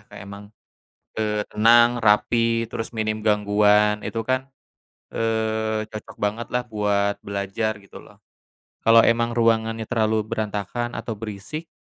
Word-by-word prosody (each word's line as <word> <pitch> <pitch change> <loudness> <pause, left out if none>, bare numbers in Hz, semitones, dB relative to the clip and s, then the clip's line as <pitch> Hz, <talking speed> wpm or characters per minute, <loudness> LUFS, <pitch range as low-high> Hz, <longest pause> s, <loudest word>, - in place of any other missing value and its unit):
Kak - - -12
emang, 100 +1 -10 0.8
eee, 105 0 -2
tenang, 120 +2 +4
rapi, 115 +2 +2
terus 115 -2 -4
minim 110 -1 -3
gangguan 105 0 +3
itu 115 - -4
kan, 130 +1 -1 0.7
eee, 110 -1 -1
cocok 110 0 -10
banget 105 +3 -2
lah 125 0 0
buat 100 -2 0
belajar 100 +2 -3
gitu 100 - -14
loh. - - -19 0.6
Kalo 115 0 +6
emang 115 0 +1
ruangannya 115 -1 +1
terlalu 110 -2 0
berantakan 110 +3 -3
atau 115 0 -4
berisik, 110 +9 -7
110 Hz, 125 wpm, -23 LUFS, 105-115 Hz, 0.8 s, Kalo